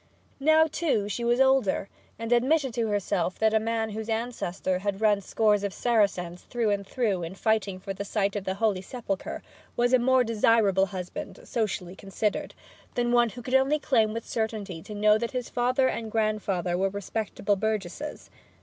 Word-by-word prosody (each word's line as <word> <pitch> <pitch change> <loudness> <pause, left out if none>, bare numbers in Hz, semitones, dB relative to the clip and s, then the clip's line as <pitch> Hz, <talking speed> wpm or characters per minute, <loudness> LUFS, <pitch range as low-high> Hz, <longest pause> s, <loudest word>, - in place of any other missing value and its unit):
Now, 315 +3 +5
too, 310 -10 0
she 210 +4 -3
was 240 +1 +2
older, 265 -7 +3 0.3
and 230 +1 -5
admitted 265 +2 +3
to 230 0 0
herself 200 -3 -1
that 220 0 +2
a 220 - +4
man 225 0 -1
whose 220 +1 -5
ancestor 220 -5 -2
had 200 0 -2
run 210 -2 +3
scores 210 0 +2
of 200 -2 -3
Saracens 195 -7 +1
through 230 -3 -1
and 200 -1 -2
through 210 -8 0
in 170 +2 -5
fighting 205 -3 0
for 195 +1 -5
the 200 - -5
site 200 0 -1
of 205 - -2
the 190 0 -2
Holy 200 -3 +1
Sepulchre 195 -2 -5 0.3
was 245 +1 +2
a 255 - +6
more 260 +1 +4
desirable 215 -4 +3
husband, 185 -2 -7
socially 195 -5 -2
considered, 195 +2 -3 0.4
than 240 0 +1
one 240 -1 +4
who 245 +2 -10
could 255 - -5
only 265 +3 +4
claim 225 -7 +2
with 230 +1 -5
certainty 215 -6 -3
to 210 - -9
know 210 +1 +4
that 235 +2 -3
his 250 -2 -3
father 255 +2 +2
and 225 -3 -3
grandfather 210 -5 0
were 195 +2 +1
respectable 205 +1 -2
burgesses. 220 +7 -4
215 Hz, 180 wpm, -27 LUFS, 195-240 Hz, 0.4 s, a